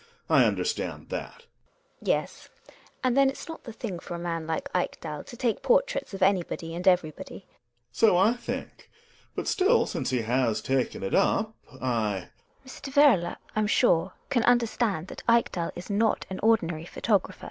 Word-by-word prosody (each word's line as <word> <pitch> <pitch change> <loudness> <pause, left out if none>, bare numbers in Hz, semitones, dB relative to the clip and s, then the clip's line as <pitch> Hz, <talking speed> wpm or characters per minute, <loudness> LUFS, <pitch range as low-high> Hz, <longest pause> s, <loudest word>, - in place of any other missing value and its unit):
I - - +6
understand 455 - -2
that. 480 - -6 0.6
GiNA. - - -4
Yes, - - -14 0.5
and 255 -1 +2
then 275 -1 +5
it's 270 - -7
not 325 - -9
the 235 - -6
thing 215 -5 -5
for 175 - -7
a - - -4
man 165 -2 -3
like 160 -1 -2
Ekdal 155 -4 -3
to 240 - -11
take 230 -3 0
portraits - - +1
of 190 - -1
anybody 175 -3 0
and 175 +2 -4
everybody. 180 +1 0
Gregers. - - -38 0.4
So 210 - +4
I 200 +6 +4
think, 245 - -7 0.5
but - - -3
still, 415 +5 +3
since - - -3
he 125 -3 0
has 120 -1 +1
taken 130 -6 -1
it 95 - -3
up 220 0 +2
— - - -21
I 110 -7 -1 0.4
GiNA. - - -18
Mr. 270 +1 -9
Werle, 245 -13 +5 0.2
I'm 215 -1 +1
sure, 185 -5 +3 0.2
can 245 - +3
understand 230 -7 +1
that - - -8
Ekdal 230 -7 +2
is 180 +4 -7
not 215 +2 +1
an 190 - -4
ordinary 175 -8 +2
photographer. 200 +2 0
190 Hz, 175 wpm, -27 LUFS, 165-235 Hz, 0.6 s, I